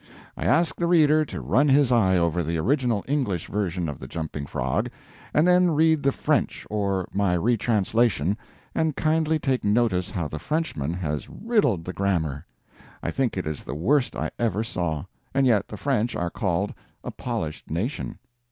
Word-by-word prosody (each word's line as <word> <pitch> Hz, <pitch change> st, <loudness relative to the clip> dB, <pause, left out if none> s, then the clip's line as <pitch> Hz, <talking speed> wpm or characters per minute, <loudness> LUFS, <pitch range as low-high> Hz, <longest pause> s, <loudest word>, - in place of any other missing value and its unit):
I -, -, -5 dB
ask 170 Hz, +1 st, +2 dB
the 170 Hz, -, 0 dB
reader 155 Hz, -3 st, +5 dB
to 75 Hz, -, -6 dB
run 115 Hz, -, +3 dB
his 135 Hz, -1 st, +4 dB
eye 95 Hz, -6 st, +4 dB
over 85 Hz, 0 st, +1 dB
the 85 Hz, +1 st, -1 dB
original 120 Hz, -, +1 dB
English 130 Hz, -, 0 dB
version 90 Hz, -4 st, -2 dB
of 75 Hz, -3 st, -5 dB
the -, -, -8 dB
Jumping 80 Hz, -3 st, -5 dB
Frog, -, -, -1 dB, 0.4 s
and 155 Hz, +4 st, +3 dB
then 180 Hz, 0 st, +5 dB
read 160 Hz, 0 st, +4 dB
the 140 Hz, -, +3 dB
French 145 Hz, -2 st, 0 dB
or 100 Hz, -3 st, 0 dB
my 100 Hz, -2 st, +2 dB
retranslation, 110 Hz, -3 st, +2 dB, 0.4 s
and 160 Hz, -3 st, 0 dB
kindly 160 Hz, 0 st, +2 dB
take 135 Hz, -4 st, 0 dB
notice 105 Hz, -4 st, +2 dB
how 85 Hz, -5 st, -2 dB
the 75 Hz, -, -6 dB
Frenchman 130 Hz, -, -2 dB
has 75 Hz, -5 st, -3 dB
riddled 200 Hz, -, +1 dB
the 90 Hz, -, -4 dB
grammar. 85 Hz, -8 st, -1 dB, 0.6 s
I -, -, -1 dB
think 130 Hz, -7 st, -1 dB
it 95 Hz, -, -2 dB
is 75 Hz, -1 st, -4 dB
the -, -, -5 dB
worst 125 Hz, -, +1 dB
I -, -, -2 dB
ever 110 Hz, -2 st, +1 dB
saw; 85 Hz, -9 st, -2 dB, 0.3 s
and 135 Hz, 0 st, +4 dB
yet 115 Hz, -6 st, +3 dB
the 105 Hz, -, -8 dB
French 120 Hz, -3 st, 0 dB
are 85 Hz, -1 st, -2 dB
called 100 Hz, -2 st, -1 dB, 0.3 s
a -, -, -5 dB
polished 110 Hz, -11 st, -4 dB
nation. 110 Hz, -, -3 dB
105 Hz, 175 wpm, -25 LUFS, 85-140 Hz, 0.6 s, reader